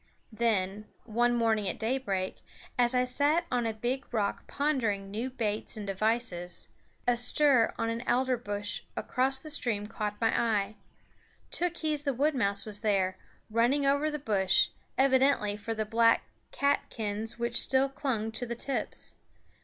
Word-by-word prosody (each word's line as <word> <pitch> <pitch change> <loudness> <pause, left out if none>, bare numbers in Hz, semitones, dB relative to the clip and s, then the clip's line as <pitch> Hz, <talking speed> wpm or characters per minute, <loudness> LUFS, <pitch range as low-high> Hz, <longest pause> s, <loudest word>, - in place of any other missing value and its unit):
Then, 215 -3 0 0.2
one 240 +2 +1
morning 220 -4 +2
at - - -3
daybreak, 220 -6 -1 0.4
as 245 0 +2
I 250 0 +3
sat 290 +7 +2
on 245 -2 +1
a - - 0
big 245 +5 -3
rock 210 -4 -1
pondering 225 -10 0
new 230 +5 -2
baits 220 -4 -2
and 210 - -5
devices, 195 -3 -1 0.4
a 245 - +4
stir 245 0 +4
on 230 -1 0
an 230 +1 -3
alder 255 +1 +2
bush 205 -3 -3 0.2
across 265 +1 +1
the 305 +3 -7
stream 230 -9 -1
caught 210 -1 -4
my 225 -1 +2
eye. 215 -2 +1 0.8
Tookhees 315 -4 -1
the 280 -3 0
wood 295 +5 +2
mouse 200 -6 0
was 210 -1 -4
there, 195 -4 +1 0.3
running 245 +6 +3
over 285 +2 +3
the 300 - -3
bush, 200 -9 +3 0.3
evidently 265 -5 +3
for 225 +2 -4
the 215 0 -1
black 230 +1 +4 0.3
catkins 225 -6 -1
which 235 0 +2
still 265 +1 +3
clung 255 -6 -2
to 245 +2 -4
the 235 - -3
tips. 270 +3 -3
230 Hz, 155 wpm, -30 LUFS, 210-265 Hz, 0.8 s, a